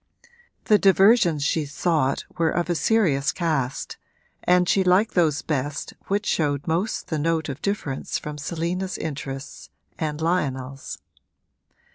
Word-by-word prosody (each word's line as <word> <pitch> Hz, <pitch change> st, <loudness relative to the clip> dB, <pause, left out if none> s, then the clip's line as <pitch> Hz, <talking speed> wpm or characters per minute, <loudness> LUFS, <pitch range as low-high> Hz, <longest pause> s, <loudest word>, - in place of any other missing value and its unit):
The 210 Hz, -1 st, +5 dB
diversions 195 Hz, -5 st, +5 dB
she 155 Hz, +1 st, +1 dB
sought 145 Hz, -2 st, 0 dB
were 165 Hz, -1 st, +2 dB
of 175 Hz, +1 st, -1 dB
a -, -, +3 dB
serious 160 Hz, -8 st, +2 dB
cast 145 Hz, -7 st, -2 dB, 0.5 s
and 180 Hz, 0 st, +4 dB
she 195 Hz, -, +3 dB
liked 185 Hz, +4 st, +3 dB
those 155 Hz, -5 st, +2 dB
best 145 Hz, 0 st, -3 dB
which 205 Hz, +2 st, 0 dB
showed 145 Hz, -3 st, 0 dB
most 175 Hz, +7 st, -1 dB
the 155 Hz, -, -1 dB
note 160 Hz, 0 st, 0 dB
of 135 Hz, -, -6 dB
difference 195 Hz, -10 st, -2 dB
from 150 Hz, 0 st, -7 dB
Selina's 175 Hz, +5 st, -3 dB
interests 140 Hz, -2 st, -6 dB, 0.3 s
and 150 Hz, -2 st, -2 dB
Lionel's. 140 Hz, -6 st, -2 dB
160 Hz, 130 wpm, -24 LUFS, 145-180 Hz, 0.5 s, The